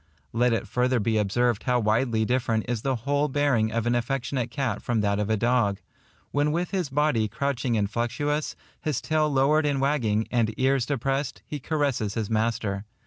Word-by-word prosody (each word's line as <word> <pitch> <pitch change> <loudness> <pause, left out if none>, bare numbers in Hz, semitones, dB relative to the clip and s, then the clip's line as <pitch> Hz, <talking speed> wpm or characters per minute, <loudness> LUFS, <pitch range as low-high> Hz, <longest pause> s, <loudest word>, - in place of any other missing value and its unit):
Let 120 +2 +3
it 115 -3 -1
further 125 0 +1
be 110 +1 +1
observed 115 +2 +1
how 125 -1 +1
widely 110 +1 +1
different 120 -2 0
is 120 -2 -2
the 135 +1 0
whole 145 +1 +2
bearing 130 -6 +1
of 115 0 -1
an 120 - +2
affectionate 120 0 -1
cat 125 -5 -2
from 115 -3 0
that 100 0 +1
of 105 0 -1
a 110 - +2
dog, 115 -3 +1 0.5
when 145 +1 +1
with 175 +3 -1
his 185 -7 -1
body 135 -6 +1
crouching 130 -2 -1
and 100 -1 +1
flexuous, 120 +7 -2 0.3
his 150 -6 -1
tail 155 +5 +1
lowered 145 +3 +3
and 140 -2 0
wagging, 120 -7 +1
and 110 -3 +1
ears 130 -1 +2
depressed, 135 +1 -2
he 150 - -5
caresses 140 -8 -1
his 110 -1 -2
master. 110 -3 0
125 Hz, 185 wpm, -26 LUFS, 110-140 Hz, 0.5 s, Let